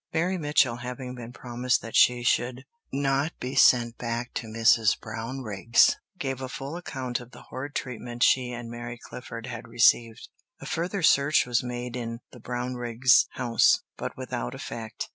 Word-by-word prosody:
Mary 175 Hz, +4 st, +1 dB
Mitchell 145 Hz, -7 st, +2 dB
having 125 Hz, +1 st, -6 dB
been 120 Hz, -2 st, -8 dB
promised 125 Hz, 0 st, -1 dB
that 115 Hz, -, -7 dB
she 125 Hz, -1 st, +5 dB
should 125 Hz, +2 st, 0 dB, 0.3 s
not 140 Hz, +2 st, 0 dB
be 130 Hz, +1 st, -4 dB
sent 120 Hz, -3 st, +4 dB
back 120 Hz, 0 st, -3 dB
to 115 Hz, -, -4 dB, 0.5 s
Brownrigg's, 115 Hz, 0 st, +1 dB, 0.2 s
gave 135 Hz, -6 st, -3 dB
a 130 Hz, -, -4 dB
full 135 Hz, +5 st, -6 dB
account 130 Hz, -8 st, -4 dB
of 125 Hz, -1 st, -12 dB
the -, -, -14 dB
horrid 140 Hz, +3 st, -6 dB
treatment 120 Hz, -1 st, -3 dB
she 125 Hz, -1 st, +3 dB
and 120 Hz, -1 st, -6 dB
Mary 120 Hz, 0 st, -6 dB
Clifford 115 Hz, -1 st, -9 dB
had 120 Hz, -1 st, -7 dB
received. 115 Hz, -1 st, +3 dB, 0.3 s
A -, -, -10 dB
further 180 Hz, +3 st, -2 dB
search 140 Hz, -1 st, +4 dB
was 120 Hz, -1 st, +1 dB
made 125 Hz, 0 st, -5 dB
in 115 Hz, -1 st, -4 dB
the 125 Hz, -, -13 dB
Brownriggs' 125 Hz, 0 st, +2 dB
house, 120 Hz, -3 st, +3 dB
but -, -, -6 dB
without -, -, -4 dB
effect. 110 Hz, -2 st, -6 dB
125 Hz, 160 wpm, -27 LUFS, 120-130 Hz, 0.5 s, she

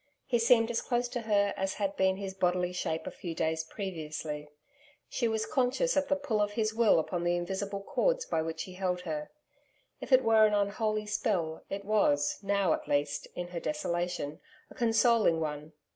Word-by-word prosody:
He 240 Hz, -2 st, +1 dB
seemed 230 Hz, 0 st, +4 dB
as 230 Hz, -, 0 dB
close 245 Hz, 0 st, 0 dB
to 245 Hz, -, -3 dB
her 205 Hz, -2 st, +2 dB
as 195 Hz, 0 st, -2 dB
had 200 Hz, -1 st, -2 dB
been 190 Hz, 0 st, +2 dB
his 195 Hz, -1 st, -5 dB
bodily 180 Hz, -1 st, 0 dB
shape 160 Hz, -2 st, -2 dB
a -, -, -4 dB
few 170 Hz, -3 st, -6 dB
days 160 Hz, 0 st, 0 dB
previously. 155 Hz, -5 st, -5 dB, 0.6 s
She 240 Hz, -, -1 dB
was 220 Hz, -1 st, 0 dB
conscious 265 Hz, -, +1 dB
of 285 Hz, 0 st, +2 dB
the 285 Hz, -, +2 dB
pull 275 Hz, -7 st, -1 dB
of 205 Hz, 0 st, 0 dB
his 220 Hz, 0 st, 0 dB
will 225 Hz, -4 st, +4 dB
upon 170 Hz, +2 st, -1 dB
the 175 Hz, 0 st, +2 dB
invisible 195 Hz, +3 st, -3 dB
cords -, -, +1 dB
by 160 Hz, -, 0 dB
which 160 Hz, 0 st, -3 dB
he 185 Hz, -, -10 dB
held 180 Hz, -1 st, -1 dB
her. 155 Hz, -3 st, -4 dB, 0.7 s
If -, -, -8 dB
it 260 Hz, 0 st, +6 dB
were 220 Hz, -1 st, +6 dB
an 210 Hz, -, +1 dB
unholy 210 Hz, +1 st, 0 dB
spell, 175 Hz, -6 st, -1 dB
it 195 Hz, 0 st, -5 dB
was, 145 Hz, -9 st, +2 dB
now, 200 Hz, -4 st, +2 dB
at -, -, -4 dB
least, 145 Hz, 0 st, 0 dB
in 175 Hz, 0 st, -4 dB
her 175 Hz, -1 st, -4 dB
desolation, 165 Hz, -1 st, -2 dB, 0.3 s
a -, -, -10 dB
consoling 230 Hz, -6 st, +3 dB
one. 150 Hz, 0 st, -4 dB
195 Hz, 190 wpm, -30 LUFS, 165-220 Hz, 0.7 s, it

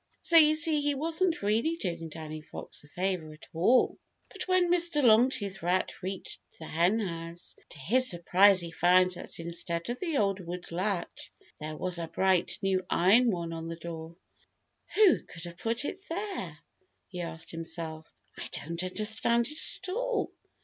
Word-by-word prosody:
So 340 Hz, -, +3 dB
you 310 Hz, -1 st, +7 dB
see 315 Hz, -2 st, +5 dB
he 290 Hz, 0 st, +1 dB
wasn't 325 Hz, -, 0 dB
really 225 Hz, +11 st, +1 dB
doing 170 Hz, -, -4 dB
Danny 155 Hz, 0 st, -7 dB
Fox 150 Hz, -, -9 dB
a -, -, -17 dB
favor 180 Hz, -1 st, -2 dB
at 155 Hz, -, -15 dB
all. 190 Hz, +10 st, +3 dB, 0.3 s
But -, -, -6 dB
when 365 Hz, -2 st, +3 dB
Mr. 340 Hz, -4 st, +2 dB
Longtooth 220 Hz, -4 st, +3 dB
Rat 180 Hz, +3 st, -1 dB
reached 190 Hz, 0 st, -5 dB, 0.2 s
the 160 Hz, -, -9 dB
Henhouse, 170 Hz, -1 st, -1 dB
to -, -, -12 dB
his 245 Hz, -, +2 dB
surprise 185 Hz, +2 st, +4 dB
he 170 Hz, -1 st, -6 dB
found 180 Hz, +2 st, +4 dB
that 175 Hz, -, -8 dB
instead 170 Hz, +3 st, -4 dB
of 245 Hz, -, -5 dB
the 330 Hz, -6 st, -1 dB
old 200 Hz, -3 st, +1 dB
wooden 175 Hz, -1 st, -7 dB
latch 190 Hz, 0 st, -3 dB, 0.3 s
there 155 Hz, 0 st, -6 dB
was 180 Hz, 0 st, -1 dB
a 165 Hz, -, -3 dB
bright 190 Hz, +1 st, +2 dB
new 190 Hz, -1 st, +1 dB
iron 220 Hz, +8 st, +5 dB
one 170 Hz, -4 st, -2 dB
on 165 Hz, 0 st, -5 dB
the 165 Hz, -, -5 dB
door. 165 Hz, 0 st, -8 dB, 0.8 s
"Who 415 Hz, -4 st, +6 dB
could 165 Hz, -, -12 dB
have 170 Hz, -1 st, -8 dB
put 230 Hz, +7 st, -1 dB
it 375 Hz, -, -4 dB
there?" 400 Hz, +4 st, -4 dB, 0.5 s
he 180 Hz, -2 st, -6 dB
asked 165 Hz, -1 st, -6 dB
himself. 165 Hz, -1 st, -6 dB, 0.3 s
"I -, -, -3 dB
don't 170 Hz, +2 st, -3 dB
understand 220 Hz, +5 st, +1 dB
it 305 Hz, +1 st, -7 dB, 0.2 s
at -, -, -6 dB
all. -, -, -1 dB
185 Hz, 170 wpm, -29 LUFS, 170-255 Hz, 0.8 s, you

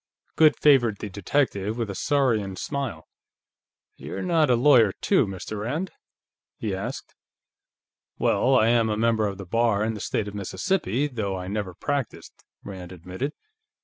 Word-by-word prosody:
Goode 155 Hz, -1 st, +5 dB
favored 120 Hz, -8 st, +4 dB
the 105 Hz, -, -6 dB
detective 100 Hz, +1 st, -1 dB
with 115 Hz, -2 st, -1 dB
a 100 Hz, -, -5 dB
saurian 110 Hz, -5 st, +1 dB
smile. 135 Hz, -, -4 dB, 0.9 s
"You're -, -, -6 dB
not 165 Hz, -5 st, +2 dB
a 125 Hz, -, +5 dB
lawyer, 120 Hz, -5 st, +5 dB
too, 185 Hz, -, +2 dB
Mr. 95 Hz, +2 st, -6 dB
Rand?" 150 Hz, -, -3 dB, 0.7 s
he 105 Hz, -3 st, -3 dB
asked. 115 Hz, +8 st, -5 dB, 1.0 s
"Well, 130 Hz, +1 st, +2 dB
I 110 Hz, -1 st, +4 dB
am 115 Hz, -2 st, +3 dB
a 105 Hz, -, -1 dB
member 110 Hz, -1 st, +2 dB
of 100 Hz, -1 st, -5 dB
the 100 Hz, -, -8 dB
Bar 115 Hz, +1 st, +1 dB
in 110 Hz, +1 st, -1 dB
the 105 Hz, -, -7 dB
State 105 Hz, +1 st, -2 dB
of 100 Hz, -, -7 dB
Mississippi, 120 Hz, -, -1 dB
though 110 Hz, -9 st, -3 dB
I 90 Hz, 0 st, -6 dB
never 100 Hz, -2 st, -3 dB
practiced," 140 Hz, -, -4 dB, 0.2 s
Rand 95 Hz, -3 st, -8 dB
admitted. 95 Hz, -, -5 dB
110 Hz, 155 wpm, -25 LUFS, 100-135 Hz, 1.0 s, Goode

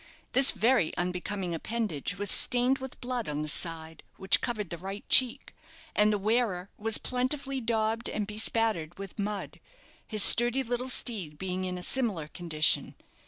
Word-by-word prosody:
This 270 Hz, +2 st, +5 dB
very 225 Hz, -4 st, +1 dB
unbecoming 180 Hz, +1 st, -3 dB
appendage 180 Hz, -4 st, -4 dB
was 200 Hz, 0 st, -1 dB
stained 250 Hz, +2 st, +3 dB
with 265 Hz, -1 st, -9 dB
blood 245 Hz, -5 st, -4 dB
on 150 Hz, 0 st, -3 dB
the -, -, -5 dB
side 160 Hz, 0 st, -3 dB, 0.2 s
which 190 Hz, -, +2 dB
covered 215 Hz, -6 st, -4 dB
the 170 Hz, -, -4 dB
right 195 Hz, +3 st, -8 dB
cheek 255 Hz, +1 st, +3 dB, 0.4 s
and 210 Hz, 0 st, +3 dB
the 210 Hz, -, 0 dB
wearer 205 Hz, -3 st, -1 dB
was 220 Hz, +1 st, +2 dB
plentifully 265 Hz, +1 st, -2 dB
daubed 225 Hz, 0 st, -1 dB
and 210 Hz, -, -3 dB
bespattered 210 Hz, -5 st, -1 dB
with 195 Hz, +1 st, -9 dB
mud, 205 Hz, 0 st, -4 dB, 0.5 s
his 215 Hz, -2 st, +4 dB
sturdy 240 Hz, +3 st, +8 dB
little 245 Hz, +1 st, -3 dB
steed 195 Hz, -, -1 dB
being 185 Hz, +2 st, -4 dB
in 180 Hz, -1 st, -4 dB
a 180 Hz, -, -6 dB
similar 205 Hz, -, -1 dB
condition. 160 Hz, -2 st, 0 dB
210 Hz, 160 wpm, -28 LUFS, 180-240 Hz, 0.5 s, sturdy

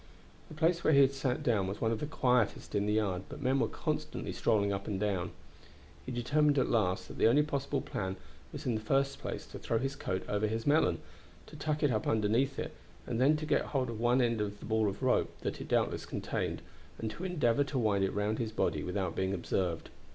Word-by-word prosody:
The 155 Hz, -, -10 dB
place 170 Hz, +2 st, +2 dB
where 155 Hz, -, +4 dB
he 140 Hz, -, +7 dB
had 135 Hz, 0 st, +5 dB
sat 135 Hz, +1 st, -1 dB
down 110 Hz, -8 st, +2 dB
was 100 Hz, +2 st, -4 dB
one 115 Hz, -, +1 dB
of 115 Hz, -, -1 dB
the 150 Hz, -, -3 dB
quietest 125 Hz, -7 st, +1 dB
in 100 Hz, 0 st, +1 dB
the 105 Hz, -, +2 dB
yard, 100 Hz, -4 st, +1 dB
but 145 Hz, -, -8 dB
men 135 Hz, 0 st, +2 dB
were -, -, +2 dB
constantly -, -, -3 dB
strolling 100 Hz, -3 st, +2 dB
up 100 Hz, 0 st, -4 dB
and 100 Hz, -3 st, -2 dB
down. 100 Hz, -4 st, 0 dB, 0.8 s
He -, -, -3 dB
determined 145 Hz, +4 st, +2 dB
at 130 Hz, -, +2 dB
last 95 Hz, -5 st, +1 dB
that -, -, -10 dB
the -, -, +6 dB
only 140 Hz, +6 st, +5 dB
possible 140 Hz, -2 st, -1 dB
plan 95 Hz, -2 st, -3 dB, 0.4 s
was -, -, -7 dB
in 125 Hz, -, +1 dB
the 110 Hz, -, -2 dB
first 135 Hz, +5 st, +1 dB
place -, -, -5 dB
to -, -, -9 dB
throw 115 Hz, -, 0 dB
his 135 Hz, +4 st, -2 dB
coat 95 Hz, -8 st, -3 dB
over 105 Hz, +1 st, 0 dB
his 110 Hz, +1 st, -2 dB
melon, 150 Hz, +2 st, +3 dB, 0.4 s
to -, -, -13 dB
tuck 150 Hz, +1 st, -2 dB
it 145 Hz, -, +4 dB
up 110 Hz, -3 st, -1 dB
underneath 110 Hz, +6 st, +2 dB
it, -, -, -4 dB, 0.3 s
then 130 Hz, +6 st, +3 dB
to 155 Hz, -, -4 dB
get -, -, +2 dB
hold 130 Hz, -4 st, -1 dB
of 110 Hz, -, -6 dB
one 120 Hz, +2 st, +3 dB
end 115 Hz, -2 st, +1 dB
of 105 Hz, 0 st, -3 dB
the -, -, -9 dB
ball 110 Hz, -1 st, +2 dB
of 100 Hz, +6 st, -7 dB
rope 130 Hz, -, +1 dB
that -, -, -3 dB
it -, -, -6 dB
doubtless -, -, 0 dB
contained -, -, -3 dB, 0.3 s
and 110 Hz, -1 st, -3 dB
to 170 Hz, -, -8 dB
endeavor 145 Hz, -8 st, +2 dB
to 140 Hz, -, -3 dB
wind 105 Hz, -5 st, +2 dB
it 95 Hz, -, +2 dB
round 105 Hz, +2 st, -1 dB
his 115 Hz, -2 st, -2 dB
body 80 Hz, -8 st, 0 dB
without 90 Hz, -1 st, -2 dB
being 95 Hz, +1 st, 0 dB
observed. 85 Hz, -2 st, -2 dB
115 Hz, 230 wpm, -32 LUFS, 105-140 Hz, 0.8 s, he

